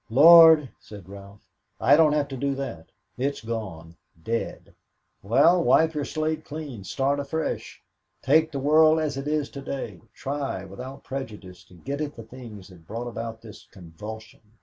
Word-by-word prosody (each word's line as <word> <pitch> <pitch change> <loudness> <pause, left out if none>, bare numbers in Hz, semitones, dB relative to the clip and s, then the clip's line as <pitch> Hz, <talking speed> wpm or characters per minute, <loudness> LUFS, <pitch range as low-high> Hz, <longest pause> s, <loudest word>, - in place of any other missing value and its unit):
"Lord," 160 +3 +8
said 100 -4 -13
Ralph, 100 +1 -13 0.3
"I - - +5
don't 155 -1 +4
have 150 -1 0
to 135 - -6
do 140 +1 -2
that 135 -12 -6 0.3
it's 140 0 -2
gone 95 -8 -6 0.3
dead." 115 +1 -4 0.5
"Well, 145 - +4
wipe 160 0 +4
your 150 -2 -2
slate 155 0 -2
clean, 145 -9 -8
start 135 +8 -1
afresh. 150 +3 -4 0.4
Take 160 +4 +3
the 140 - -4
world 155 +3 +4
as 150 -3 -2
it 135 +1 -5
is 150 -1 0
to 140 - -8
day, 125 -9 -6
try, 135 -9 -4
without 125 +8 -9
prejudice, 105 -9 -8
to 90 - -19
get 140 - -5
at 150 -1 -4
the 115 - -9
things 110 -4 -11
that 85 -3 -17
brought 115 +4 -5
about 115 -1 -6
this 110 -2 -13
convulsion. 105 +5 -11
135 Hz, 165 wpm, -25 LUFS, 105-150 Hz, 0.5 s, Lord